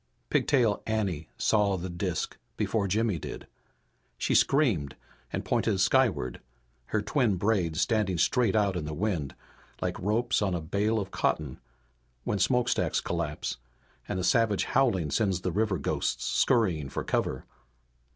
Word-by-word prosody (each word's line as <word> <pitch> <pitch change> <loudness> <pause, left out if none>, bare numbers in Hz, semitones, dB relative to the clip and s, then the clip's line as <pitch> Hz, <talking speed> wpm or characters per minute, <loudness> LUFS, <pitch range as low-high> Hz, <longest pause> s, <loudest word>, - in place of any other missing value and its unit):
Pigtail 120 -7 +2
Anne 95 -8 -1
saw 100 -3 +2
the 90 +1 -4
disk 85 -1 -3 0.2
before 105 -3 0
Jimmy 105 -2 +1
did. - - -7 0.7
She - - 0
screamed 110 - +2 0.4
and - - -3
pointed 95 - +1
skyward, 110 - +2 0.5
her 110 -1 -1
twin 120 -5 +1
braids 90 -5 0
standing 105 -6 +1
straight 115 - +2
out 100 -3 +2
in 85 -4 -3
the 75 0 -4
wind 85 -7 -2 0.4
like - - -2
the - - -10
ropes 115 +5 +1
on 95 -3 +1
a - - -1
bale 100 +8 0
of 100 -1 -5
cotton, 75 -4 -1 0.6
when 105 - -1
smokestacks 120 +5 +2
collapse - - -3 0.5
and 95 - -2
a - - -2
savage 110 0 +3
howling 95 - +1
sends 95 -2 +1
the 90 - -1
river 105 +1 +1
ghosts - - -2
scurrying 90 - +2
for 65 - -3
cover. - - -1
100 Hz, 145 wpm, -28 LUFS, 85-110 Hz, 0.7 s, savage